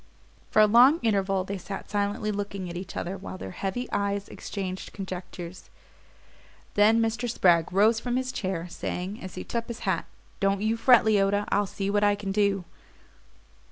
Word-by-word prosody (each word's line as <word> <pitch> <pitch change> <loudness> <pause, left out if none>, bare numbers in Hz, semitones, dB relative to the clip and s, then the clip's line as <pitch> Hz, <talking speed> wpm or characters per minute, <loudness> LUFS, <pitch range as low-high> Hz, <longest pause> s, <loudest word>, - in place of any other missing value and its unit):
For 215 - +5
a - - +8
long 245 +9 +6
interval 195 -3 +1
they 195 +1 -5
sat 195 +2 -7
silently 205 +1 -1
looking 200 -2 -4
at - - -8
each 185 +1 -6
other 185 +3 -3
while 190 0 -8
their 95 - -7
heavy 195 - -3
eyes 200 0 -1
exchanged 190 -2 -6
conjectures: 185 -2 -7 1.0
then 215 +2 +5
Mr. 230 +1 0
Spragg 175 -7 +3
rose 215 +4 +4
from 245 +1 -2
his 255 0 -1
chair, 185 -6 -3
saying, 180 +3 -5
as 185 -1 -8
he 185 - -5
took 230 -1 -3
up - - -27
his 235 -1 -6
hat: 190 -5 0 0.3
"Don't 195 0 +2
you 220 +1 +2
fret, 235 0 +6
Leota; 205 -1 +2
I'll 205 0 +2
see 195 +1 -3
what 205 0 +2
I 205 0 +4
can 200 -1 -4
do." 200 -2 +1
200 Hz, 180 wpm, -27 LUFS, 190-220 Hz, 1.0 s, a